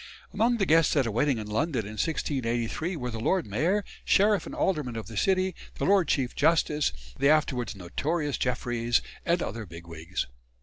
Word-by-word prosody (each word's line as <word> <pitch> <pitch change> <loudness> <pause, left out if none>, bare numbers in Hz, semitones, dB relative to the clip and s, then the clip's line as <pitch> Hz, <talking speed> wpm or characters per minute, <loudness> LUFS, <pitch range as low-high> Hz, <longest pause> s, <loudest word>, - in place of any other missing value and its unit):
Among 235 +3 +2
the 200 - +1
guests 165 -2 +4
at 140 -3 +3
a 115 - -1
wedding 125 +4 +1
in 110 - -4
London 115 +2 -1
in 105 - -7
1683 130 - -1
were 125 -5 -4
the 115 - -5
Lord 180 +9 +1
Mayor, 165 - 0 0.2
Sheriff 205 0 +3
and - - -7
Aldermen 150 -10 0
of 115 - -4
the 115 - -9
City, 185 - +2 0.2
the - - -2
Lord 195 -3 +4
Chief 130 -3 0
Justice 150 -1 +2 0.3
the 140 - +4
afterwards 140 -7 +1
notorious 145 - -2
Jeffreys 120 -2 0 0.2
and 170 0 +2
other 110 -1 -5
"bigwigs." 85 +1 -5
140 Hz, 175 wpm, -28 LUFS, 115-170 Hz, 0.3 s, guests